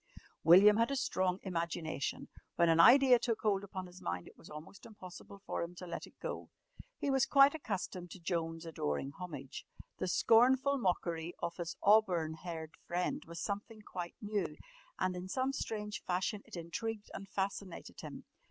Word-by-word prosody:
William 195 +6 +8
had 230 +2 +3
a 280 - -1
strong 185 -8 0
imagination. 165 -5 -3 0.3
When 170 -1 +4
an 165 0 +4
idea 255 +4 +8
took 230 -2 -1
hold 200 -2 +1
upon 190 -2 -6
his 180 0 -13
mind, 85 0 -3
it - - -14
was - - -15
almost 155 +5 -10
impossible 200 -1 -11
for - - -2
him 170 +1 -5
to 180 - -8
let 175 - -6
it - - -21
go. - - -5 0.5
He 280 - -1
was 270 -2 +3
quite 275 0 +7
accustomed 190 - -4
to 190 - -10
Joan's 165 -1 -2
adoring 135 - -2
homage. 145 -5 -7 0.4
The - - -1
scornful 260 +8 +4
mockery 175 -4 -1
of 170 0 -4
his 170 -2 -4
auburn 185 -7 +4
haired 160 -1 -7
friend 175 +1 -1
was 170 0 -8
something 210 +4 -4
quite 175 -3 -6
new, 205 -7 -2 0.4
and 185 0 0
in 180 +1 -5
some 260 +6 0
strange 210 -5 -4
fashion 190 +3 -1
it - - -10
intrigued 210 +6 -4
and 195 0 -7
fascinated 195 -2 -4
him. - - -8
185 Hz, 170 wpm, -34 LUFS, 170-215 Hz, 0.5 s, William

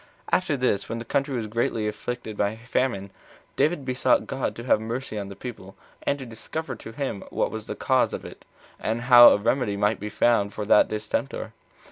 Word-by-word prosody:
1. - - +6
After 165 -6 -2
this, 125 -6 0
when 115 - -3
the 115 - -6
country 135 +2 0
was 115 -3 -2
greatly 110 0 -1
afflicted 110 +1 -5
with 105 - +1
a 110 - -12
famine, 115 -6 -1 0.4
David 150 0 +1
besought 130 0 +2
God 135 -1 -3
to 115 - -7
have 115 -3 +3
mercy 115 0 -4
on 100 -1 -5
the 100 - -8
people, 100 -5 -9 0.3
and 140 - 0
to 135 - -8
discover 130 +5 -6
to 110 - -10
him 130 -5 -4
what - - -1
was - - -6
the - - -4
cause - - +2
of - - -6
it, - - -11 0.4
and 115 +2 -2
how 120 -1 +9
a - - +4
remedy 105 -1 0
might 105 +1 +1
be 105 - -5
found 105 -2 +2
for 105 - -4
that 105 - +5
distemper. 105 -1 -3
115 Hz, 210 wpm, -25 LUFS, 105-130 Hz, 0.4 s, how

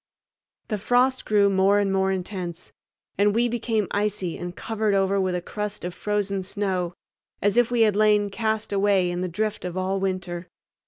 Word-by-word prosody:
The 215 -3 -1
frost 250 +5 +2
grew 205 -1 +4
more 195 +1 +3
and 200 -1 +1
more 190 0 +2
intense, 185 -2 -5 0.5
and 205 +1 +3
we 240 +1 +3
became 225 -3 -1
icy 205 -4 -1
and 175 0 -6
covered 220 -2 -1
over 195 0 +2
with 185 -1 0
a 175 - -3
crust 210 -1 -5
of 180 - -4
frozen 205 -1 -1
snow, 185 -2 -2 0.4
as 205 +1 +1
if 240 -1 +4
we 240 -1 +1
had 215 -3 +4
lain 210 -1 +3
cast 220 0 -1
away 195 -3 +2
in 175 0 -3
the 185 - -1
drift 215 +4 -2
all 185 +2 -2
winter. 185 -2 -3
200 Hz, 175 wpm, -25 LUFS, 185-210 Hz, 0.5 s, grew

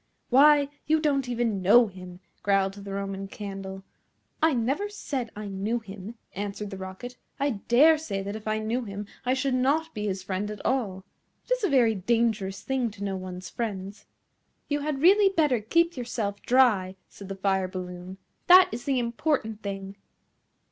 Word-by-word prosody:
"Why, 285 +2 +6 0.2
you 315 +1 +3
don't 280 -4 0
even 230 -5 0
know 220 +6 +7
him," 185 -2 -10 0.2
growled 195 -1 +2
the 200 0 -9
Roman 195 0 -4
Candle. 195 -1 -7 0.6
"I 320 - +5
never 275 - 0
said 270 - -4
I 210 0 -6
knew 200 +4 -2
him," 205 0 -9 0.2
answered 205 +1 -5
the 195 - -6
Rocket. 190 +7 -8 0.2
"I 280 +1 +1 0.2
dare 305 +6 +6
say 200 -11 -4
that 200 +2 -5
if 220 0 -8
I 215 0 +1
knew 225 +4 -1
him 205 -1 -6 0.2
I 255 - +3
should 270 0 0
not 290 +6 +1
be 210 -1 -3
his 190 -1 -3
friend 190 +2 -3
at 210 - -8
all. 200 -8 -1 0.4
It - - -19
is - - +1
a 400 - +2
very 245 -5 +4
dangerous 210 -1 0
thing 260 -3 0
to 205 -1 -9
know 195 -1 -2
one's 185 -1 -7
friends." 200 -3 -5 0.6
"You 290 0 0
had 290 -1 -3
really 395 +3 +6
better 300 -10 +2
keep 335 +10 +2
yourself 225 -5 -3
dry," 220 -8 +3
said 200 -1 -12
the 195 - -4
Fire 190 -1 0
balloon. 180 0 -7 0.3
"That 365 +1 +8
is 240 - -6
the 275 -2 +1
important 235 -2 -1
thing." 195 -1 -6
215 Hz, 175 wpm, -27 LUFS, 195-265 Hz, 0.6 s, That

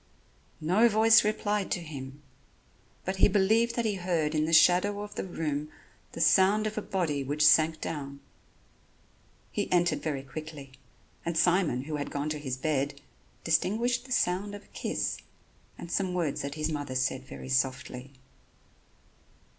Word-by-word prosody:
No 190 +9 +3
voice 220 +1 +6
replied 210 -1 -1
to - - -1
him, 140 -3 -9 0.8
but 190 +1 -2
he - - +6
believed 220 +4 +2
that 235 - -1
he 215 - +1
heard 170 -4 -1
in 155 0 +1
the 160 - -2
shadow 180 +5 +4
of 210 - -9
the - - -4
room 150 -4 -3 0.4
the - - -7
sound 195 +5 +4
of 215 0 -3
a 215 - -2
body 165 -9 -1
which 145 +3 +1
sank 155 +1 +5
down. 140 -3 -5 1.3
He - - -3
entered 175 -4 +2
very 145 -3 -3
quickly; 150 -1 -9 0.5
and 170 -1 -2
Simon, 170 -8 +2
who 150 +1 -4
had 145 - -4
gone 145 +1 -3
to 150 -1 -3
his 130 -3 -4
bed, 140 0 -1 0.4
distinguished 225 +10 +1
the 260 - -13
sound 200 -2 0
of 205 - -10
a - - -24
kiss - - -2 0.6
and 170 - -8
some 185 -2 -1
words 165 -6 -1
that 140 +1 -5
his 155 0 -2
mother 145 -3 -4
said 130 0 0
very 65 - -9
softly. 125 - -1
160 Hz, 160 wpm, -28 LUFS, 145-195 Hz, 1.3 s, voice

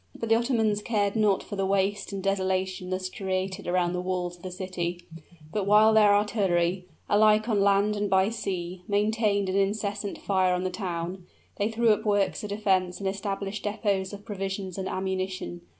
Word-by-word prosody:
But 230 - -3
the 225 - +6
Ottomans 225 -3 +1
cared 205 -2 0
not 210 -3 +2
for 205 - -7
the 195 - -1
waste 195 +1 0
and 195 -1 -5
desolation 190 -1 -1
thus 185 0 -2
created 190 0 -3
around 175 0 +1
the 180 - -2
walls 180 -1 -2
of 175 - -21
the 185 - -6
city; 180 -1 -4 0.5
but 200 -2 -1
while 215 +2 +6
their 210 -2 +6
artillery, 185 -4 +1 0.2
alike 215 +1 +4
on 210 -4 +2
land 200 +1 +3
and 205 0 -1
by 190 +1 +3
sea, 185 -5 -4
maintained 205 -1 +1
an 190 +1 0
incessant 200 0 -1
fire 185 -2 +1
on 180 - -2
the 185 - -1
town, 180 -1 -4 0.3
they 205 +2 0
threw 230 +1 +2
up 210 - +3
works 205 -2 +1
of 210 - -5
defense 190 -3 +1
and 200 - -2
established 195 +1 -3
depots 205 -2 -1
of 205 0 -10
provisions 195 -2 -4
and 190 - -3
ammunition. 185 - -3
195 Hz, 180 wpm, -27 LUFS, 185-210 Hz, 0.5 s, the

